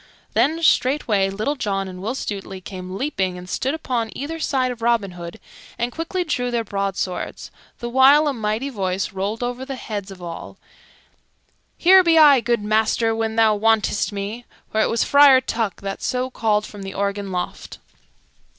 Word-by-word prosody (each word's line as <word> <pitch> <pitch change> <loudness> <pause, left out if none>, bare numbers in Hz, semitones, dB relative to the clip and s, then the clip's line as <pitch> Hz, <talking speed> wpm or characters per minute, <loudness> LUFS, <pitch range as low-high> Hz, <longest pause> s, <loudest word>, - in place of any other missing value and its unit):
Then 295 +9 +1
straightway 245 -10 +2
Little 215 +9 -2
John 195 -7 -2
and 180 -1 -9
Will 225 +6 -3
Stutely 195 -5 -5
came 185 0 -8
leaping 190 -10 -2
and 180 0 -10
stood 265 - -1
upon 245 -7 -2
either 320 +4 -5
side 260 -4 0
of 240 -2 -8
Robin 230 -4 +1
Hood, 170 -1 -9 0.4
and 240 +1 -1
quickly 335 +4 -3
drew 250 -7 -1
their 235 -1 -1
broadswords, 195 -3 -4 0.3
the 240 - -5
while 270 +5 +5
a 290 - +1
mighty 220 +3 -2
voice 195 -4 -2
rolled 200 +5 -3
over 245 +1 -3
the 270 0 -5
heads 205 -5 -6
of 195 -1 -11
all, 170 -2 -8 1.2
"Here 375 +2 +7
be 335 -2 +4
I, 290 -4 +8
good 235 -2 0
master, 220 +1 +1
when 225 0 -2
thou 225 -1 +4
wantest 215 0 +1
me;" 205 +4 -5 0.3
for 220 - +1
it - - +2
was 230 - +1
Friar 280 -2 +7
Tuck 225 -5 -3
that 195 0 -5
so 255 +1 -2
called 210 -3 0
from 205 - -10
the 195 0 -7
organ 200 0 -2
loft. 180 -1 -5
225 Hz, 175 wpm, -21 LUFS, 195-260 Hz, 1.2 s, I